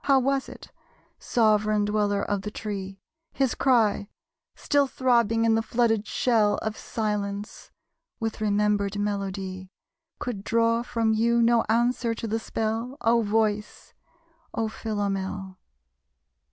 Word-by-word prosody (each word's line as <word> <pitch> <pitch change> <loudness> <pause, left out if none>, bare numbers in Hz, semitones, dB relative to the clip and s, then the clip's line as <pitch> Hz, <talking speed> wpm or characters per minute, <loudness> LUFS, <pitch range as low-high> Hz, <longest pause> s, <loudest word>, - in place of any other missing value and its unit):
How 275 -1 +5
was 270 +1 0
it, - - -12 0.5
sovran 215 -2 +2
dweller 205 -1 0
of 205 -1 -1
the 210 - -5
tree, 195 -2 -6 0.3
His 270 -3 +1
cry, 225 -6 +2 0.5
still 285 -2 +2
throbbing 235 -4 +2
in 225 - +4
the 225 - +2
flooded 225 -1 +1
shell 215 -5 +2
Of 220 0 -2
silence 210 -2 -4 0.5
with 225 -2 -3
remembered 205 -1 +1
melody, 195 -2 -3 0.5
Could 220 -6 -5
draw 230 +1 +2
from 230 -2 0
you 235 +2 +2
no 235 0 +4
answer 235 0 +1
to 230 - -5
the 225 +1 -1
spell? 225 +4 -3
O 235 +1 +3
Voice, 210 -1 -1 0.6
O 225 - 0
Philomel? 195 -3 -3
220 Hz, 125 wpm, -26 LUFS, 205-230 Hz, 0.6 s, How